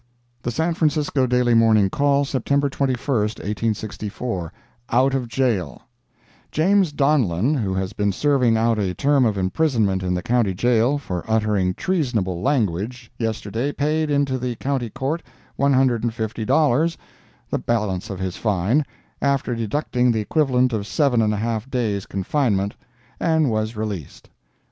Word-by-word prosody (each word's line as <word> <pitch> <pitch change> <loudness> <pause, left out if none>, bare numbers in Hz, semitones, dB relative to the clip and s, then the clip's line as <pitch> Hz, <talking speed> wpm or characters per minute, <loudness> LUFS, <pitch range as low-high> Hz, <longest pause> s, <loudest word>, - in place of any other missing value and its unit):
The 120 - -3
San 160 +7 0
Francisco 150 -4 +1
Daily 125 -1 +2
Morning 110 -3 +5
Call, 140 +6 +2
September 140 +2 0
21, 135 -2 0
1864 105 - -2 0.4
OUT 130 +3 +3
OF 130 -3 -1
JAIL 115 - -1 0.7
James 185 +1 +3
Donlan, 135 - +2
who 105 -10 -1
has 95 +1 -2
been 100 0 0
serving 125 -1 +2
out 115 0 +2
a 95 -3 -1
term 140 -2 +3
of 105 -3 0
imprisonment 100 -1 +1
in 90 -1 -1
the 90 - -3
County 115 -5 +1
Jail, 120 +6 +2
for 90 - -4
uttering 105 -4 +1
treasonable 115 - -1
language, 115 - -1
yesterday 110 +3 -2
paid 155 +2 0
into 140 -2 +1
the 125 -1 -3
County 130 -1 -2
Court 135 +7 -3 0.3
one 140 0 +2
hundred 130 -3 +2
and 115 -2 -1
fifty 110 -1 -3
dollars, 155 +4 +2 0.5
the - - 0
balance 105 -4 -1
of 95 - -5
his 95 -2 -3
fine, 105 - +1 0.4
after 140 -3 +1
deducting 125 +2 0
the 110 - 0
equivalent 130 +1 +1
of 105 -2 -2
seven 135 -5 +2
and 105 -1 +2
a 105 - -1
half 115 +2 -2
days 110 -7 -1
confinement, 100 -1 0 0.5
and 160 -5 +2
was 110 +1 -1
released. 105 -8 -6
120 Hz, 150 wpm, -22 LUFS, 105-140 Hz, 0.7 s, Morning